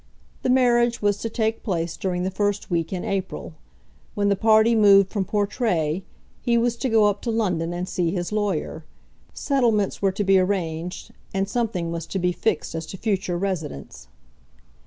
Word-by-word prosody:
The - - -1
marriage 240 -2 +3
was 205 -1 +2
to 225 - -3
take 220 0 -1
place 170 -4 -2
during 180 -2 -2
the 190 - -1
first 205 0 -1
week 165 -2 0
in 185 -2 -3
April. 195 -3 -3 0.6
When 205 -1 +1
the 200 - +3
party 220 +2 +4
moved 200 -3 +6
from 200 -3 -1
Portray, 195 -6 0 0.4
he 235 -1 +2
was 235 0 +1
to 260 - -1
go 220 -2 +4
up 205 -1 +1
to 240 - -3
London 180 -7 0
and 175 +1 -3
see 180 -2 0
his 175 0 -3
lawyer. 200 -6 -2 0.5
Settlements 235 -8 +1
were 195 -1 +3
to 200 +2 -2
be 195 -1 +5
arranged, 180 -3 -2 0.2
and 195 0 0
something 200 -7 -2
was 170 -1 -5
to - - -3
be 180 -1 +1
fixed 195 +1 -1
as 160 -1 -5
to 190 - -7
future 190 -4 -1
residence. 160 - -5
195 Hz, 180 wpm, -23 LUFS, 175-220 Hz, 0.6 s, moved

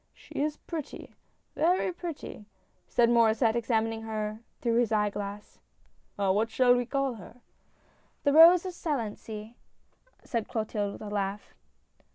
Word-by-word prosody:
" - - -45
She - - -16
is 300 0 -1
pretty, 315 -4 -7 0.4
very 360 +3 +2
pretty! 330 - -7 0.2
" - - -42
said 240 -1 +3
Maurdsset, 230 -1 +4
exam 225 -1 +1
ining 225 0 -4
her 215 -1 -3 0.2
through 235 -1 +1
his 240 -2 +2
eye 210 -1 +2
glass. 205 +1 -7 0.3
" - - -40
What 200 +3 +1
shall 245 +2 +4
we 245 -1 -1
call 275 0 0
her?" 235 +7 -14 0.4
" - - -37
The 285 - +3
Rose 335 +3 +8
of 370 - -4
Salency," 225 -8 -4 0.7
said 230 -3 -3
Clotilde 215 -4 -2
with - - -11
a 210 - -6
laugh. 200 0 -3
230 Hz, 160 wpm, -28 LUFS, 210-275 Hz, 0.7 s, Rose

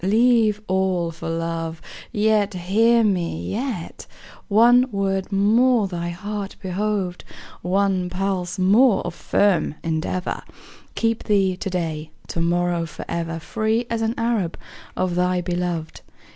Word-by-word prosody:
Leave 220 +1 +3
all 185 -2 +1
for 165 0 -6
love; 165 0 -3 0.3
Yet, 210 -1 +2
hear 225 +6 +3
me, 170 - -1
yet, 230 -7 -4 0.4
One 240 +4 +5
word 195 -1 -1
more 220 +3 +3
thy 175 -2 -4
heart 200 +3 -5
behoved, 190 -1 -2 0.4
One 185 0 +1
pulse 185 0 -2
more 205 +5 +4
of 175 - -3
firm 180 -5 +1
endeavor, 165 +3 -2 0.5
Keep 230 0 0
thee 195 -3 +2
to 195 - -4
day, 160 -4 -3 0.2
To 165 - -2
morrow, 175 0 +1
forever, 165 +1 -4
Free 220 +6 -1
as 230 -1 -1
an 225 +1 0
Arab 230 -7 0 0.4
Of 185 -1 0
thy 180 +1 +1
beloved. 175 -2 -3
190 Hz, 125 wpm, -22 LUFS, 175-215 Hz, 0.5 s, One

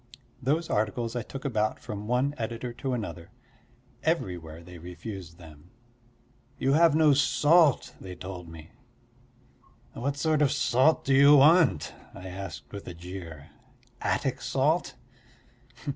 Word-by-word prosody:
Those 155 +6 0
articles 115 +3 -1
I 120 - -1
took 135 +5 -9
about 110 -5 0
from 105 -4 -7
one 125 +4 +1
editor 120 0 -4
to 130 +2 -3
another; 85 -8 -6 0.7
everywhere 85 -2 -2
they 90 0 -12
refused 90 0 -8
them: 80 -1 -15 0.9
you 135 +1 +1
have 165 0 +5
no 155 -2 +5
salt 150 +1 +3
they 90 -1 -8
told 90 -1 -8
me. 80 -1 -12 1.2
"What 140 +3 -3
sort 155 +1 +1
of 145 - +3
salt 130 +6 +2
do 135 - +2
you 140 +2 +7
want?" 150 - +5 0.2
I 95 +1 -8
asked 90 -6 -8
with 100 - -8
a 90 - -7
jeer. 85 -4 -9 0.5
"Attic 135 -1 -1
salt?" 150 +3 0
115 Hz, 130 wpm, -27 LUFS, 90-140 Hz, 1.2 s, you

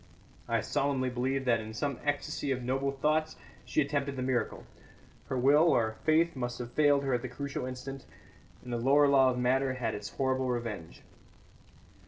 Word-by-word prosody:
I - - +1
solemnly 135 -2 0
believe 130 +2 -1
that 120 -2 +3
in 110 0 -7
some 140 +2 -2
ecstasy 145 -1 -2
of 130 -1 -2
noble 135 +2 0
thoughts 155 +3 0 0.3
she - - +1
attempted 140 -1 -2
the 130 - -3
miracle. 130 -2 -1 0.6
Her 130 - -2
will, 145 +6 +5
or 110 -6 +1
faith, 160 +1 +3
must 120 -2 -3
have 120 -1 -6
failed 145 -1 +3
her 135 -1 0
at 120 - +1
the 130 - -5
crucial 140 +1 -4
instant, 130 +1 -7 0.6
and 125 -1 -6
the - - 0
lower 140 +5 +4
law 135 -2 +5
of 125 - -1
matter 130 +1 +1
had 115 -4 -2
its 105 -1 -5
horrible 130 -1 -1
revenge. 115 -9 -4
130 Hz, 180 wpm, -30 LUFS, 125-140 Hz, 0.6 s, will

